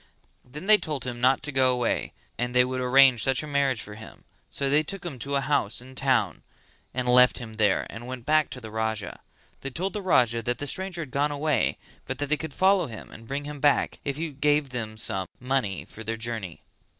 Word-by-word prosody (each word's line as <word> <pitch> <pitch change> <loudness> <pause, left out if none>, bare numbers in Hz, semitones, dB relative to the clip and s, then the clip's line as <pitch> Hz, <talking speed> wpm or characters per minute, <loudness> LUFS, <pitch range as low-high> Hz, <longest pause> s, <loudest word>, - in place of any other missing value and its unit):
Then 150 +8 -9
they 210 0 +6
told 150 -4 -3
him 120 -1 -5
not 130 +3 +3
go 130 -1 +4
away 125 -2 -1 0.2
and 120 +1 -3
they 125 0 +6
would 130 0 -3
arrange 130 -1 +6
such 135 +3 +1
a - - -5
marriage 140 -5 0
for 105 - -10
him, 110 +1 -12 0.3
so 140 - -2
they 145 +3 +4
took 185 +5 -5
him 145 -8 -6
to 140 +4 -2
a 140 - +2
house 135 -6 +1
in 125 +1 -9
the - - -13
town 130 -9 +1 0.5
and 125 0 -2
left 125 0 +6
him 110 -3 -8
there 105 -4 +2
and 115 +3 -9
went 125 -2 -7
back 155 -1 +3
to 125 - -7
the 110 -3 -9
Raja. 110 -3 -2 0.4
They 135 - -5
told 185 +8 -3
the 210 - -3
Raja 120 - +3
that 120 +2 -2
the 145 - -5
stranger 180 +2 -3
had 135 - -12
gone 145 +3 +1
away 145 0 0 0.3
but - - -3
that 145 -1 -3
they 150 - +2
could 160 0 -6
follow 190 -3 +3
him 110 -2 -10
and 115 0 -12
bring 140 +3 -3
him 145 0 -7
back 145 0 +2
if 140 -1 -3
he 160 0 -3
gave 145 0 +1
them 110 -3 -5
some 95 -4 0
money 125 -7 -1
for 110 - -10
their 115 +1 -3
journey. 110 -7 -5
130 Hz, 230 wpm, -26 LUFS, 115-145 Hz, 0.5 s, they